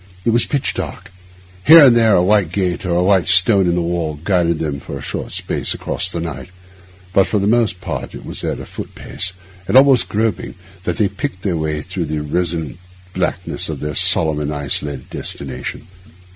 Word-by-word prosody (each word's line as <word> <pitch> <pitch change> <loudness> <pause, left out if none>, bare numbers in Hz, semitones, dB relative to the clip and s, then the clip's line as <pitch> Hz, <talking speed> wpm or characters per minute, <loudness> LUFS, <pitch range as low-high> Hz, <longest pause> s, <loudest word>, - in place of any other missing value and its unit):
It 115 - +3
was 120 +1 +3
pitch 140 -2 -1
dark; - - -6 0.5
here 160 +4 +9
and 125 -4 +7
there 115 -3 +4
a 90 - +4
white 100 -3 +2
gate 90 0 -1
or 85 - 0
a 90 - +2
white 95 -2 +3
stone 95 +1 +4
in 85 - +1
the 90 - 0
wall 85 -3 -2
guided 85 -3 +1
them 75 -3 -3
for 70 - -7
a - - -9
short - - -5
space - - -2
across - - -2
the 85 - -4
night; 80 -1 -6 0.6
but 95 - +4
for 105 - 0
the 100 - 0
most 110 -4 +1
part - - -5
it - - -10
was - - -7
at - - -2
a - - -7
foot - - -9
pace, 95 0 -2 0.4
and - - +4
almost 135 -3 +5
groping, 105 -3 -1 0.3
that 90 - -1
they 105 - +3
picked 100 +1 -5
their 95 -4 0
way 75 -1 -2
through 90 -2 -4
that 75 0 -3
resonant 85 +1 -2 0.3
blackness 90 -3 -2
to - - -3
their 75 0 -5
solemn 80 0 +3
and 75 0 -2
isolated 70 -1 -3
destination. 65 -2 -5
90 Hz, 200 wpm, -18 LUFS, 80-100 Hz, 0.6 s, here